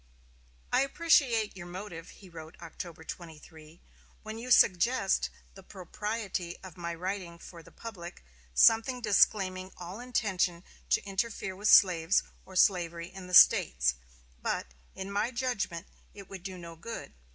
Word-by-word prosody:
"I -, -, +5 dB
appreciate 275 Hz, -, +2 dB
your 175 Hz, -2 st, -9 dB
motive," 175 Hz, -2 st, -8 dB
he 195 Hz, -, -15 dB
wrote 165 Hz, 0 st, -11 dB
October 170 Hz, 0 st, -9 dB
23, 160 Hz, -1 st, -11 dB, 0.4 s
"when 220 Hz, +1 st, -7 dB
you 245 Hz, +2 st, -7 dB
suggest 200 Hz, -1 st, +3 dB, 0.2 s
the 195 Hz, -, -13 dB
propriety 190 Hz, -1 st, -5 dB
of 185 Hz, -4 st, -10 dB
my 170 Hz, -1 st, -5 dB
writing 180 Hz, -1 st, -5 dB
for 170 Hz, 0 st, -12 dB
the -, -, -16 dB
public 175 Hz, -, -9 dB, 0.3 s
something 225 Hz, -, +5 dB
disclaiming 190 Hz, -3 st, +2 dB
all 180 Hz, +4 st, -8 dB
intention 190 Hz, -8 st, -1 dB, 0.3 s
to -, -, +2 dB
interfere 195 Hz, -1 st, -3 dB
with 205 Hz, +3 st, -2 dB
slaves 180 Hz, -2 st, +5 dB, 0.2 s
or 190 Hz, -, -12 dB
slavery 170 Hz, -3 st, +2 dB
in 190 Hz, -1 st, -10 dB
the 180 Hz, -, 0 dB
States: 65 Hz, -, +6 dB, 0.5 s
but, 60 Hz, -, -3 dB, 0.2 s
in 190 Hz, +1 st, -6 dB
my 205 Hz, +4 st, 0 dB
judgment, 235 Hz, -9 st, -3 dB, 0.3 s
it 200 Hz, -2 st, -11 dB
would 195 Hz, -2 st, -9 dB
do 190 Hz, 0 st, -7 dB
no 170 Hz, -1 st, -10 dB
good. 225 Hz, +8 st, -8 dB
185 Hz, 140 wpm, -30 LUFS, 170-210 Hz, 0.5 s, States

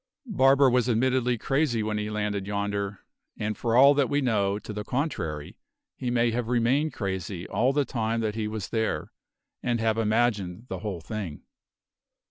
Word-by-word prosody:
Barber 140 Hz, -, +4 dB
was 125 Hz, -1 st, +2 dB
admittedly 125 Hz, +1 st, +2 dB
crazy 135 Hz, -2 st, +1 dB
when 105 Hz, 0 st, -1 dB
he 105 Hz, 0 st, -3 dB
landed 105 Hz, -2 st, -2 dB
yonder, 100 Hz, -1 st, -3 dB, 0.3 s
and 110 Hz, 0 st, -2 dB
for 115 Hz, +1 st, -1 dB
all 140 Hz, +2 st, +8 dB
that 140 Hz, -2 st, +2 dB
we 145 Hz, -, +2 dB
know 105 Hz, -7 st, +1 dB
to 105 Hz, -, -7 dB
the 105 Hz, 0 st, -4 dB
contrary 90 Hz, -, -3 dB, 0.4 s
he 125 Hz, -, -3 dB
may 120 Hz, -1 st, +2 dB
have 120 Hz, 0 st, -2 dB
remained 125 Hz, +6 st, +2 dB
crazy 95 Hz, -3 st, -4 dB
all 125 Hz, +3 st, +2 dB
the 145 Hz, 0 st, +1 dB
time 115 Hz, -2 st, -1 dB
that 110 Hz, -1 st, -1 dB
he 110 Hz, -1 st, -2 dB
was 105 Hz, -3 st, -5 dB
there, 110 Hz, -1 st, -1 dB, 0.5 s
and 120 Hz, -2 st, 0 dB
have 110 Hz, 0 st, +1 dB
imagined 110 Hz, -3 st, 0 dB
the -, -, -4 dB
whole 100 Hz, -6 st, -4 dB
thing." 85 Hz, -2 st, -6 dB
110 Hz, 170 wpm, -27 LUFS, 105-125 Hz, 0.5 s, all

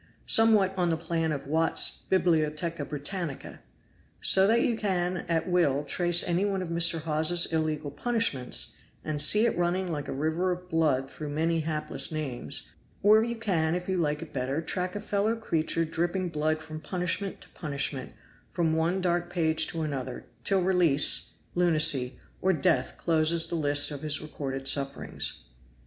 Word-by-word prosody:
Somewhat 215 Hz, -4 st, +4 dB
on 180 Hz, -2 st, +1 dB
the 165 Hz, -, 0 dB
plan 165 Hz, 0 st, -1 dB
of 140 Hz, -2 st, -4 dB
'Watt's 160 Hz, +3 st, +1 dB
Bibliotheca 165 Hz, -3 st, 0 dB
Britannica.' 150 Hz, +1 st, -5 dB, 0.6 s
So 190 Hz, 0 st, +5 dB
that 230 Hz, +2 st, +4 dB
you 235 Hz, -, +1 dB
can 185 Hz, -4 st, 0 dB
at 165 Hz, +1 st, 0 dB
will 160 Hz, -6 st, +2 dB
trace 175 Hz, +2 st, +3 dB
any 175 Hz, +2 st, 0 dB
one 195 Hz, -2 st, -1 dB
of 175 Hz, -, -7 dB
Mr. 170 Hz, -1 st, +3 dB
Hawes's 160 Hz, +2 st, +2 dB
illegal 155 Hz, -2 st, -1 dB
punishments, 150 Hz, -, -1 dB, 0.3 s
and 150 Hz, -2 st, -2 dB
see 210 Hz, +9 st, +3 dB
it -, -, +1 dB
running 175 Hz, +1 st, -1 dB
like 145 Hz, -3 st, -4 dB
a -, -, -4 dB
river 160 Hz, +6 st, -1 dB
of 180 Hz, 0 st, -5 dB
blood 150 Hz, -5 st, +1 dB
through 150 Hz, +2 st, -7 dB
many 165 Hz, +3 st, 0 dB
hapless 155 Hz, 0 st, -2 dB
names; 145 Hz, -6 st, -4 dB, 0.4 s
or 215 Hz, +2 st, +6 dB
you 235 Hz, 0 st, -3 dB
can, 175 Hz, -8 st, 0 dB
if 180 Hz, 0 st, -4 dB
you 190 Hz, -, 0 dB
like 150 Hz, -2 st, -1 dB
it 165 Hz, -, -13 dB
better, 135 Hz, +3 st, -2 dB
track 180 Hz, +3 st, -3 dB
a -, -, -2 dB
fellow 205 Hz, +2 st, 0 dB
creature 165 Hz, -6 st, -1 dB
dripping 175 Hz, +3 st, -2 dB
blood 155 Hz, 0 st, -1 dB
from 155 Hz, 0 st, -8 dB
punishment 180 Hz, +2 st, -2 dB
to -, -, -14 dB
punishment, 140 Hz, -4 st, -4 dB, 0.4 s
from 165 Hz, -2 st, 0 dB
one 165 Hz, +4 st, 0 dB
dark 175 Hz, -1 st, 0 dB
page 160 Hz, -3 st, +1 dB
to 165 Hz, -1 st, -4 dB
another, 135 Hz, -4 st, -5 dB, 0.2 s
till 190 Hz, +4 st, +2 dB
release, 175 Hz, -6 st, +3 dB, 0.2 s
lunacy, 155 Hz, -7 st, +3 dB, 0.2 s
or 190 Hz, 0 st, +3 dB
death 135 Hz, -4 st, +1 dB
closes 165 Hz, 0 st, +1 dB
the 170 Hz, -, -3 dB
list 145 Hz, -2 st, +2 dB
of 145 Hz, -2 st, -6 dB
his 155 Hz, -1 st, 0 dB
recorded 135 Hz, -3 st, -5 dB
sufferings." 140 Hz, 0 st, 0 dB
165 Hz, 165 wpm, -28 LUFS, 150-180 Hz, 0.6 s, or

